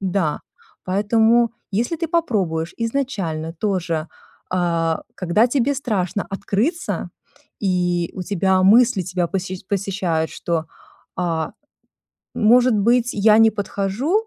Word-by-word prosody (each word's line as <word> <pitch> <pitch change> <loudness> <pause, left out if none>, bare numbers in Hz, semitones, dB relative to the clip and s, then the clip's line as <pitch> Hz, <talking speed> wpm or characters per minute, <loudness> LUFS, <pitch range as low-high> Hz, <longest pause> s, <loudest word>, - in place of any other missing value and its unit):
Да, 185 -5 -1 0.4
поэтому 225 +4 +3 0.2
если 230 - -1
ты 330 0 -3
попробуешь 195 - -1
изначально 205 - -2
тоже, 170 -3 -2 0.4
а, 170 -2 0
когда 190 +6 +2
тебе 270 +2 +1
страшно 205 -7 -2
открыться, 220 - -2 0.5
и 180 -3 0
у 185 - -4
тебя 190 0 +1
мысли 230 +1 +5
тебя 180 -1 -2
посещ 185 0 -4
посещают, 185 -5 -1
что: 165 -2 -2 0.5
"А, 165 -3 -2 0.8
может 240 +2 +4
быть, 235 +4 +2
я 215 +1 +4
не 225 0 +6
подхожу?" 215 - -1
195 Hz, 110 wpm, -21 LUFS, 175-230 Hz, 0.8 s, не